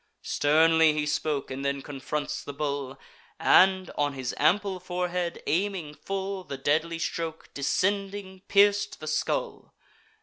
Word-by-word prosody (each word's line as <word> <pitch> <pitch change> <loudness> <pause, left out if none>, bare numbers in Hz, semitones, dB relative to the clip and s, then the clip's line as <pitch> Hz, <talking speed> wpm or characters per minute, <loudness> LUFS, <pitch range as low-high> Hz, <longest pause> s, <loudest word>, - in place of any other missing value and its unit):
Sternly 160 +1 +4
he 150 0 -1
spoke, 150 -1 -1
and 135 +1 -4
then 140 -1 -1
confronts 145 +2 -4
the 145 - -7
bull; 140 -2 -3 0.4
And, 190 -1 +5
on 145 -1 0
his 130 -2 -4
ample 190 +5 +2
forehead 180 -1 -3
aiming 180 -3 -1
full, 195 +3 -4
The 140 - -6
deadly 155 +5 0
stroke, 165 0 -4
descending, 195 +5 -1
pierc'd 205 0 +3
the 155 - -8
skull. 155 0 -2
160 Hz, 130 wpm, -27 LUFS, 145-190 Hz, 0.4 s, And